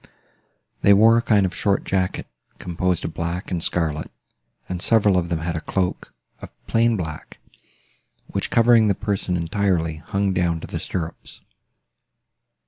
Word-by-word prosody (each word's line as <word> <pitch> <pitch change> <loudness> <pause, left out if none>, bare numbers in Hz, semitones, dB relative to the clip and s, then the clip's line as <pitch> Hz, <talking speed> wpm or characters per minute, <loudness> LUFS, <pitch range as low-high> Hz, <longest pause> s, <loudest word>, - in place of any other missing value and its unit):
They 100 - +6
wore 115 +3 +6
a - - 0
kind 105 -4 +3
of 90 - -3
short 100 -2 0
jacket, 95 -1 -1 0.3
composed 90 0 -2
of 80 - -4
black 85 +3 -4
and 90 -2 -1
scarlet, 80 -3 -1 0.6
and 90 -1 -4
several 105 -3 +4
of 85 -2 0
them 85 -2 -2
had 85 0 -3
a 80 - -3
cloak, 90 +2 -2 0.3
of - - -9 0.2
plain 115 0 +2
black, 80 -4 -7 0.9
which, - - -4
covering 115 -1 +5
the 100 - +2
person 100 -3 -2
entirely, 85 -2 0
hung 100 +5 -1
down 85 -3 0
to - - -6
the - - -5
stirrups. 85 -2 -6
90 Hz, 150 wpm, -22 LUFS, 85-100 Hz, 0.9 s, They